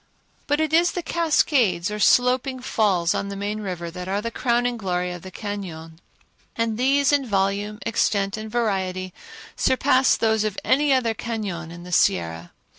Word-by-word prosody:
But 290 +1 +1
it 315 -1 0
is 340 +2 +4
the 355 - -3
cascades 260 - +1
or 210 - -4
sloping 255 +4 +3
falls 195 -8 +1
on 195 - -2
the 200 - -5
main 205 +2 -3
river 175 -4 -5
that 180 +1 -7
are 195 +2 -1
the 230 +2 -4
crowning 245 0 0
glory 180 -4 -2
of 175 -1 -7
the 190 - -9
cañon, 175 -6 -7 0.6
and 230 -1 -1
these 275 +2 +3
in 285 -1 +3
volume, 205 -1 -1
extent 200 -3 0
and 215 0 -6
variety 190 -5 -2 0.4
surpass 260 0 +3
those 220 -1 +2
of 215 -2 -2
any 285 +2 +2
other 250 -4 +2
cañon 200 -8 -5
in 175 0 -10
the 180 - -10
Sierra. 85 - +1
210 Hz, 170 wpm, -23 LUFS, 185-250 Hz, 0.6 s, is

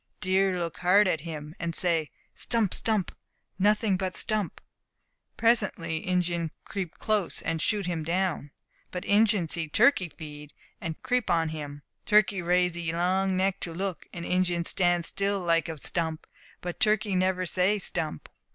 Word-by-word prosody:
Deer 190 -1 +2
look 170 -2 -3
hard 190 +3 +5
at 160 -5 0
him, 155 -2 -7
and 170 -1 -2
say 165 -4 +2 0.2
"stump! 225 -5 0
stump! 215 -5 0 0.4
nothing 210 0 +3
but 185 -1 -3
stump!" 215 -5 -1 0.8
Presently 210 -8 +1
Injin 175 -2 0 0.2
creep 185 -5 -5
close, 210 -5 0
and 165 -1 -1
shoot 205 0 0
him 170 -3 -2
down. 170 -3 -1 0.4
But 180 - -5
Injin 205 -4 +3
see 160 0 -4
turkey 210 - +4
feed, 150 -2 -10 0.3
and 160 -1 -4
creep 250 -1 0
on 165 -1 +2
him. 145 -2 -7 0.2
Turkey 210 -2 +4
raise 180 0 +2
'ee 170 -2 -2
long 185 +3 +1
neck 190 0 +1
to 165 -2 -5
look, 190 -2 -4
and 170 -1 -6
Injin 180 -2 +1
stand 175 -2 +2
still 200 +2 0
like 165 -2 +1
a 160 - -5
stump; 160 +1 -2 0.4
but 175 -1 -5
turkey 210 -2 +2
never 185 0 +1
say 185 +4 +2
"stump!" 165 - -3
180 Hz, 155 wpm, -28 LUFS, 165-195 Hz, 0.8 s, hard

